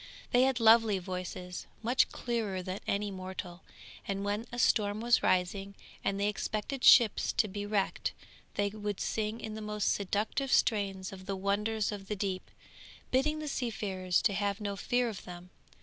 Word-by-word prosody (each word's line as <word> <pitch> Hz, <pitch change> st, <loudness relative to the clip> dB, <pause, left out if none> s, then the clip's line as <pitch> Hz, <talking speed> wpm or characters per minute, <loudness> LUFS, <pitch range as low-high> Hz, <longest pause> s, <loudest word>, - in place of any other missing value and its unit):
They 245 Hz, -, +5 dB
had 265 Hz, -2 st, +1 dB
lovely 225 Hz, -2 st, +6 dB
voices, 180 Hz, -1 st, -5 dB, 0.2 s
much 245 Hz, +4 st, +3 dB
clearer 215 Hz, -6 st, -2 dB
than 185 Hz, +2 st, -4 dB
any 205 Hz, 0 st, 0 dB
mortal, 185 Hz, -1 st, -7 dB, 0.5 s
and 195 Hz, 0 st, -2 dB
when 205 Hz, +3 st, -2 dB
a 240 Hz, -, -6 dB
storm 210 Hz, -3 st, +2 dB
was 235 Hz, +1 st, +3 dB
rising, 195 Hz, +2 st, 0 dB, 0.3 s
and 195 Hz, 0 st, 0 dB
they 200 Hz, -, +2 dB
expected 215 Hz, +5 st, -3 dB
ships 235 Hz, -5 st, +7 dB
to 215 Hz, -, +2 dB
be 205 Hz, +1 st, -5 dB
wrecked, 205 Hz, -2 st, 0 dB, 0.4 s
they 205 Hz, 0 st, +1 dB
would 205 Hz, -1 st, -4 dB
sing 220 Hz, +1 st, -2 dB
in 220 Hz, -, -6 dB
the 215 Hz, -, -6 dB
most 210 Hz, -1 st, 0 dB
seductive 210 Hz, +7 st, -1 dB
strains 195 Hz, -4 st, +1 dB
of 185 Hz, 0 st, -11 dB
the 195 Hz, -, -1 dB
wonders 210 Hz, +3 st, 0 dB
of 200 Hz, -2 st, -7 dB
the 210 Hz, -, -2 dB
deep, 190 Hz, -2 st, -3 dB, 0.6 s
bidding 295 Hz, +4 st, +2 dB
the 310 Hz, 0 st, -5 dB
seafarers 200 Hz, -9 st, -1 dB
have 200 Hz, 0 st, -1 dB
no 200 Hz, -1 st, -3 dB
fear 245 Hz, +4 st, +1 dB
of 215 Hz, -4 st, -6 dB
them. 180 Hz, 0 st, -10 dB
205 Hz, 165 wpm, -31 LUFS, 195-220 Hz, 0.6 s, ships